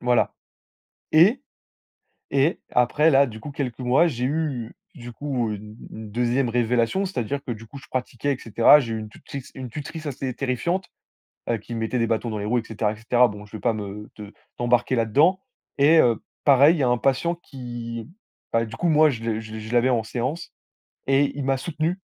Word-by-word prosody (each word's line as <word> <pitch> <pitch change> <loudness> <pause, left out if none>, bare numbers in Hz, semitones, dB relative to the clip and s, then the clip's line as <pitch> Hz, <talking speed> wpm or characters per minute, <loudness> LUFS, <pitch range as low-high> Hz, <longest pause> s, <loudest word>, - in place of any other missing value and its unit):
Voilà, 125 -1 +2 0.8
et 195 - +5 0.9
et 140 +4 +2
après 145 +6 +3
là, 140 -1 +5
du 110 -2 -9
coup, 145 - -7
quelques 135 -4 -4
mois, 130 +7 +4
j'ai 125 -6 -2
eu, 140 -5 -2 0.2
du 120 -5 -9
coup, 125 -3 -2
une 105 +1 -7
une 110 -1 -9
2e 120 +3 +1
révélation, 120 - +1
c'est-à-dire 140 - -3
que, - - -5
du 115 0 -9
coup, 140 - -10
je 135 - -14
pratiquais 130 +2 -2
et 130 - -10
cetera, 115 +6 +6
j'ai 115 -4 -3
eu - - -3
une 110 - -7
tutrice 135 +5 -9
une 130 -1 -6
tutrice 155 +4 -7
assez 135 -2 -3
terrifiante, 170 +9 -1 0.6
heu, 115 - +1
qui 115 +3 -8
me 115 - -3
mettait 115 +3 -1
des 115 - +2
bâtons 115 +1 -1
dans 110 - -3
les 100 - -4
roues 120 +3 +1
et 115 - -3
cetera 110 -1 -1
et - - -9
cetera. 120 +3 +3
Bon, 105 -1 -9
je 105 +1 -10
vais - - -9
pas 120 - +2
me 105 0 -6
te 105 -1 -10 0.2
t'embarquer 120 +1 +1
là-dedans, 145 - +3 0.4
et 155 +4 +6
heu, 115 -6 +3 0.2
pareil, 145 +4 +6
il - - -4
y 140 - +1
a 125 - +3
un 125 0 +2
patient 135 +8 +1
qui, 120 -7 -7 0.4
bah, 115 0 +2
du 115 0 -8
coup, 175 - 0
moi, 155 -1 +5
je 115 -3 -5
le 110 -1 -1
je 110 -1 -10
le - - -5
je 110 +2 -8
l'avais 120 +2 +3
en 120 -3 +2
séance, 125 +8 -4 0.6
et 135 +1 +3
il 145 - -2
m'a 135 0 +1
soutenu, 165 +5 -2
125 Hz, 215 wpm, -24 LUFS, 115-140 Hz, 0.9 s, cetera